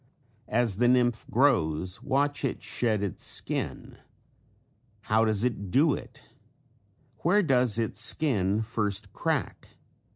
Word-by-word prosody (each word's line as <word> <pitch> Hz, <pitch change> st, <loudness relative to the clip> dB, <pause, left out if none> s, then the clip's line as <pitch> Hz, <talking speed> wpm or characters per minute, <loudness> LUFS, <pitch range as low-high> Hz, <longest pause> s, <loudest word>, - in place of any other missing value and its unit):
As 115 Hz, -3 st, 0 dB
the 120 Hz, +2 st, +3 dB
nymph 120 Hz, -2 st, +2 dB
grows 90 Hz, -, +1 dB
watch 145 Hz, +2 st, 0 dB
it 135 Hz, -, -2 dB
shed 110 Hz, -4 st, -1 dB
its 100 Hz, -, -4 dB
skin. -, -, -3 dB, 1.0 s
How 110 Hz, +1 st, +2 dB
does 110 Hz, -1 st, 0 dB
it 105 Hz, -6 st, -2 dB
do 145 Hz, -, +3 dB
it? -, -, -9 dB, 1.0 s
Where 205 Hz, +5 st, +3 dB
does 125 Hz, -, +2 dB
its 110 Hz, -2 st, -2 dB
skin 110 Hz, -7 st, +1 dB
first 105 Hz, -3 st, -3 dB
crack? -, -, -3 dB
115 Hz, 120 wpm, -27 LUFS, 100-130 Hz, 1.0 s, the